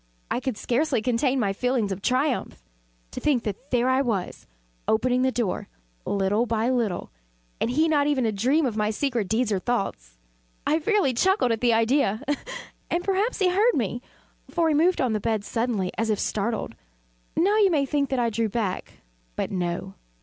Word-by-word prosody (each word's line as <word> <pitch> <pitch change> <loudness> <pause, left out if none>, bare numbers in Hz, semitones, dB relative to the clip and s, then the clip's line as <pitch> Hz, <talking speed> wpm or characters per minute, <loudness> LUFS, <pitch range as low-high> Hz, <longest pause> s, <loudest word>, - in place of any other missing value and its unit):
I - - +1
could 260 -4 -3
scarcely 250 -1 0
contain 255 +2 +1
my 200 -5 +1
feelings 245 -2 0
of 190 +1 -4
triumph. 255 - 0 0.5
To - - -5
think 265 -6 +1
that 215 +7 -5
there 245 0 +2
I 260 +1 +3
was, 215 -9 -3 0.4
opening 250 +3 +2
the 260 0 +2
door, 235 -7 -2 0.4
little 205 +4 +1
by 230 +2 +1
little, 225 -8 -1 0.5
and - - 0
he 310 +6 +2
not 290 -2 +2
even 285 -4 +1
to 225 - +1
dream 260 +10 +2
of 235 -5 -1
my 210 -1 +1
secret 235 -2 -1
deeds 220 +2 +1
or 195 - +1
thoughts. 180 - -3 0.5
I 310 - +2
fairly 380 -5 +2
chuckled 375 - +2
at 225 - -1
the 240 -2 +4
idea; 225 -1 +2 0.7
and 345 +1 0
perhaps 395 +5 0
he 380 -3 +3
heard 420 +7 +3
me; 240 0 -1 0.5
for 335 -2 +1
he - - +2
moved 340 +5 +3
on 250 -4 +1
the 215 - 0
bed 215 -1 -1
suddenly, 225 -6 -1
as 225 0 0
if 215 - +2
startled. 215 - -2 0.6
Now 395 +6 +3
you 410 -3 +5
may 295 -5 +2
think 280 0 0
that 265 - 0
I 235 -2 +1
drew 225 0 0
back 205 -4 -3 0.4
but - - -2
no. 180 0 -3
245 Hz, 185 wpm, -25 LUFS, 215-285 Hz, 0.7 s, you